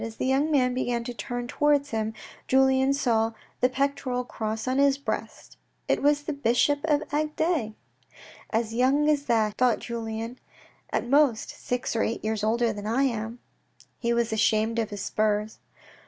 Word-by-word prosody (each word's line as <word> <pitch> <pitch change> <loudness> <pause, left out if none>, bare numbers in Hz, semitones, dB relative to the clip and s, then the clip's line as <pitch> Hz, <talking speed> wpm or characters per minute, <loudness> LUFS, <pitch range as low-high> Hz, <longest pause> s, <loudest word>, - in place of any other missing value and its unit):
As 225 -1 -6
the - - -2
young 270 +4 +2
man 255 -4 +2
began 245 -2 -1
to 245 - -5
turn 245 0 -5
towards 290 +1 +1
him, 220 -1 -2 0.3
Julien 265 0 +4
saw 230 -5 +1 0.3
the 250 - +3
pectoral 270 -2 -1
cross 220 -1 -4
on 260 +1 +1
his 280 -1 +4
breast, 280 - -5 0.3
It - - +1
was 290 +1 +3
the 300 - -3
bishop 280 +2 +2
of 300 -2 +2
Agde. 305 -6 0 0.7
"As 225 0 -1
young 265 +5 +3
as 290 -2 +2
that," 220 -4 +1
thought 250 -2 +4
Julien. 230 +1 -5 0.3
" - - -29
At - - -2
most 275 -4 +3
six 245 -1 -3
or 225 - +1
eight 225 - -2
years 215 -1 -1
older 230 +1 +2
than 205 0 -6
I 240 +5 +2
am! 230 -2 -2 0.3
" - - -28
He 235 -1 0
was 235 -1 +1
ashamed 220 +1 +2
of 220 -2 -1
his 205 -2 -6
spurs.' 215 0 -1
245 Hz, 175 wpm, -26 LUFS, 225-275 Hz, 0.7 s, Julien